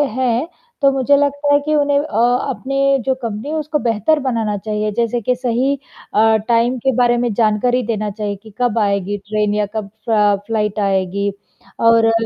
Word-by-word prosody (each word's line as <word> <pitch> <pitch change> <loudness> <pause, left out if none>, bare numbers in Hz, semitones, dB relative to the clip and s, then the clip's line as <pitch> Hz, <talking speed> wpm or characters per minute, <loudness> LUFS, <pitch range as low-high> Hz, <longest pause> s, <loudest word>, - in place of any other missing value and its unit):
हैं 255 +3 0 0.3
तो 275 0 +5
मुझे 270 +1 +3
लगता 285 0 +1
है 285 - +5
कि 305 +1 0
उन्हें 285 -1 +2
अ, - - -1 0.5
अपनी 275 +1 +1
जो 265 - +2
कंपनी 225 +4 -4
है 315 - -2
उसको 300 -1 -1
बेहतर 235 +7 +1
बनाना 220 -3 -1
चाहिए, 210 +1 -2
जैसे 235 0 0
कि 250 +4 0
सही 255 +2 0 0.4
अ, 220 +1 +4
टाइम 240 +2 +2
के 265 +3 +1
बारे 240 -1 +3
में 240 -3 0
जानकारी 230 +3 +2
देना 215 -2 -1
चाहिए 205 -1 -4
कि 220 -2 -14
कब 235 -2 +1
आएगी 200 -1 0
ट्रेन 210 -1 0
या 210 0 +1
कब 215 -2 -2 0.2
अ, 210 -2 +4
फ्लाइट 215 -1 -1
आएगी। 195 0 0 0.5
और 230 0 +5
अ, 225 - +4
230 Hz, 185 wpm, -18 LUFS, 210-265 Hz, 0.5 s, तो